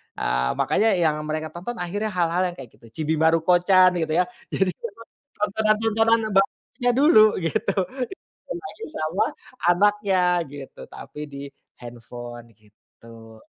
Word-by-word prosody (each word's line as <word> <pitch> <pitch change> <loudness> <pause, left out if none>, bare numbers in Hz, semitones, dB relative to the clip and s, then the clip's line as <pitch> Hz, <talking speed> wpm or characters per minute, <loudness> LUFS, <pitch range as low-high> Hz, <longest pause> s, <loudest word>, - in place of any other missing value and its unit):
Ah, 65 +1 0
makanya 215 -2 +2
yang 155 -3 +1
mereka 155 0 -3
tonton 180 +9 -6
akhirnya 205 +1 -3
hal-hal 180 -2 0
yang 175 - -6
kayak 130 -7 -11
gitu. - - -18
Chibi 160 0 0
Maruko-chan, 175 +3 +4
gitu 160 -1 -1
ya. 180 - +4 0.2
Yang 190 -1 0
ditonton 230 +5 -10 0.3
tontonan-tontonan 220 +2 +2
yang - - -4
bagusnya 245 +5 0
dulu, 265 -6 +7 0.2
gitu. 165 +4 -1 0.7
Dikasih 390 +5 -7
sama 170 - -1 0.5
anaknya, 185 -2 +2
gitu, 140 -2 -10
tapi - - -10
di 140 0 -7 0.4
handphone, 120 0 -10
gitu. 110 +1 -17
175 Hz, 130 wpm, -23 LUFS, 145-210 Hz, 0.7 s, dulu